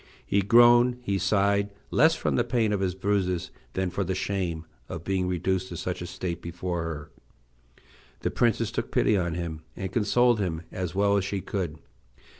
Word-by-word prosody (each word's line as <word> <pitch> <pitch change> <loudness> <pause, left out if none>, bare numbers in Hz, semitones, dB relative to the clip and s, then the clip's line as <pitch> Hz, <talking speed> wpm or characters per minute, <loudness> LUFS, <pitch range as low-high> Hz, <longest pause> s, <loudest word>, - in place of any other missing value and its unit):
He 100 - +2
groaned, 120 +4 +6
he 100 -4 0
sighed, 100 +1 +2 0.2
less 160 +4 +5
from - - -1
the 120 - +3
pain 115 -3 +1
of 100 - 0
his 95 -2 -1
bruises 95 -3 0 0.2
than 95 -1 -1
for 100 +2 -1
the 95 0 -2
shame 90 -4 -2 0.2
of 85 - -6
being 95 0 0
reduced 90 +1 0
to 85 - -6
such 90 +2 -3
a 90 - -4
state 85 -1 -4
before 85 0 -3
her. 80 -2 -5 1.1
The - - -1
princess 115 -2 +1
took 115 +1 -3
pity 110 - +3
on 85 -3 0
him, 85 -3 -4
and 95 -2 -4
consoled 120 +2 +3
him 85 -4 -2
as 90 -1 -4
well 100 +1 +3
as 100 - +1
she 100 0 -2
could. 90 -5 -3
95 Hz, 185 wpm, -27 LUFS, 90-105 Hz, 1.1 s, groaned